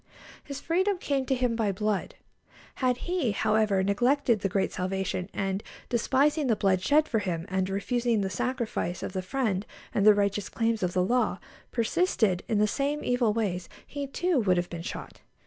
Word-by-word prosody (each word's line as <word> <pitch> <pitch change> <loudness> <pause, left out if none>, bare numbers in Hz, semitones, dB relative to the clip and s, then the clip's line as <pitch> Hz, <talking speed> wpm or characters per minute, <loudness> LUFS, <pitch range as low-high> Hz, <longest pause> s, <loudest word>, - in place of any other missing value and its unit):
His 280 -1 -6
freedom 375 +6 +1
came 275 -6 -1
to 265 - +2
him 245 -2 0
by 220 -3 +1
blood. 210 +1 -2 0.7
Had 250 -1 +2
he, 350 - 0
however, 210 -2 +2
neglected 240 +4 +2
the 195 - -1
great 195 +1 0
salvation, 185 0 -2
and, 195 0 -2 0.3
despising 280 +5 +2
the 230 - +3
blood 195 -3 +2
shed 300 +9 +3
for 225 - +1
him, 175 -5 -3
and 190 0 0
refusing 230 +3 0
the 195 - -1
sacrifice 220 -3 -2
of - - -4
the 190 - -1
friend 200 -1 -1 0.3
and 200 - +1
the 210 0 +8
righteous 200 -1 0
claims 225 -1 0
of 180 -1 0
the 180 - +2
law, 245 +6 +1 0.3
persisted 225 - +1
in 220 - +1
the 210 - +4
same 285 +6 -1
evil 245 -3 +2
ways, 195 -5 -2 0.2
he, 285 -1 -5
too, 345 +2 +1
would 185 -4 +2
have 175 0 -2
been 170 -1 -5
shot. 170 - -7
215 Hz, 180 wpm, -28 LUFS, 190-260 Hz, 0.7 s, the